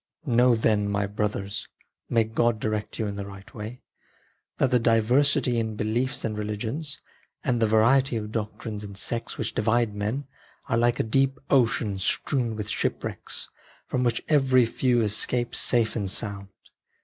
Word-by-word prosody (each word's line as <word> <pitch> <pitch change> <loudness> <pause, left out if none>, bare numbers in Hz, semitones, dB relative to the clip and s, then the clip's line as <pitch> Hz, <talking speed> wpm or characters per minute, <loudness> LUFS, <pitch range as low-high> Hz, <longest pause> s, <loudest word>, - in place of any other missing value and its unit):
Know 125 -2 +4
then, 105 -2 +2
my 100 0 0
brothers 100 0 -3 0.4
(may 115 -1 +3
God 110 +1 +1
direct 110 -1 -3
you 110 - -1
in 100 -1 -4
the 100 - -4
right 100 -1 -12
way), 110 +3 -8 0.7
that 135 - +2
the 125 - +4
diversity 120 +2 +3
in 110 -1 -2
beliefs 115 +5 -1
and 110 -1 -2
religions, 110 +8 -4 0.4
and 120 -4 0
the 110 - +4
variety 120 +4 +4
of 105 -1 -5
doctrines 105 -1 -4
and 100 -1 -8
sects 115 +3 -2
which 110 - -3
divide 115 0 +1
men, 105 +7 -2 0.4
are - - 0
like 120 0 +2
a - - +3
deep 135 +4 +1
ocean 115 -6 +2
strewn 120 +4 0
with 105 -1 -4
shipwrecks, - - -3 0.4
from 125 - -1
which 120 -2 0
very 130 -5 +4
few 120 +1 +1
escape 115 +3 0
safe 115 -3 +3
and 100 -4 -1
sound. 100 -1 -2
115 Hz, 160 wpm, -26 LUFS, 105-125 Hz, 0.7 s, Know